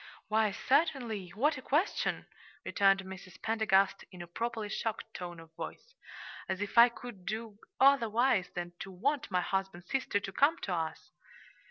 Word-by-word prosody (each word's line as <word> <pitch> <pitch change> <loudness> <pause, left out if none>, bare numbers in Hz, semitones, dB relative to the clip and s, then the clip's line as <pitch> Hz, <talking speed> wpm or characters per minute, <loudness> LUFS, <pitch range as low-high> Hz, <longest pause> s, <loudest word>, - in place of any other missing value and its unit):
"Why, 220 0 +3
certainly; 240 - 0
what 285 +5 +2
a - - -10
question!" 300 +8 0 0.4
returned 195 -1 +3
Mrs. 190 -2 -10
Pendergast, 205 -3 +2
in 180 -2 -8
a - - -11
properly 225 +4 -3
shocked 220 +2 -4
tone 175 -2 -7
of 165 0 -15
voice. 485 - -8 0.6
"As 190 0 -1
if 205 0 -4
I 235 +1 +9
could 235 -5 -10
do 215 +1 -5 0.2
otherwise 245 -5 +4
than 175 0 -4
to 195 - -6
want 260 +10 -1
my 180 -2 +1
husband's 190 -1 -3
sister 260 -6 +1
to 195 - -6
come 285 - +3
to 190 - -1
us." 160 -2 -4
210 Hz, 160 wpm, -32 LUFS, 190-240 Hz, 0.6 s, I